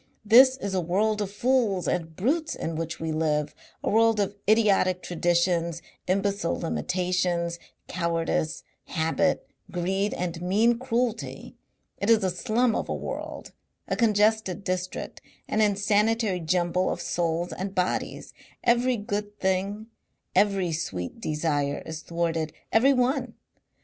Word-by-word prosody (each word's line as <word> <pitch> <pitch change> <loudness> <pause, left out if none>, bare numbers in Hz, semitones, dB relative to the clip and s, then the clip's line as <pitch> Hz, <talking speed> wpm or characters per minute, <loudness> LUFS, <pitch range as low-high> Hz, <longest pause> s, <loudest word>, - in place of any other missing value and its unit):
This 255 +5 +7
is 200 -7 -4
a 185 - +1
world 210 +5 +1
of 200 - -2
fools 210 -4 +1
and 165 -2 -2
brutes 310 - 0
in 165 - -4
which 165 +1 -4
we 160 0 -2
live, 155 -2 0 0.3
a - - 0
world 225 0 +4
of 200 0 0
idiotic 200 -4 +3
traditions, 170 -1 0 0.2
imbecile 195 -1 0
limitations, 175 0 -1 0.3
cowardice, 165 -2 -1 0.2
habit, 165 +4 0 0.2
greed 190 +3 -1
and 170 -1 -3
mean 220 +6 +2
cruelty. 240 -2 -2 0.4
It 200 - -1
is 225 -3 +5
a 185 - +1
slum 230 +5 +1
of - - -2
a - - -1
world, - - -6 0.4
a - - 0
congested 215 -4 +2
district, 185 -1 -4 0.3
an 220 - +1
insanitary 210 0 +2
jumble 175 +2 +1
of - - -2
souls 170 0 -1
and 195 +1 -5
bodies. 180 -1 -2 0.3
Every 245 +1 +3
good 205 0 -4
thing, 195 +3 -1 0.5
every 195 -4 +2
sweet 95 - -4
desire 150 -2 -1
is 160 0 -6
thwarted 165 -2 -2 0.2
every 250 +5 +5
one. 250 -1 0
185 Hz, 130 wpm, -26 LUFS, 170-215 Hz, 0.5 s, This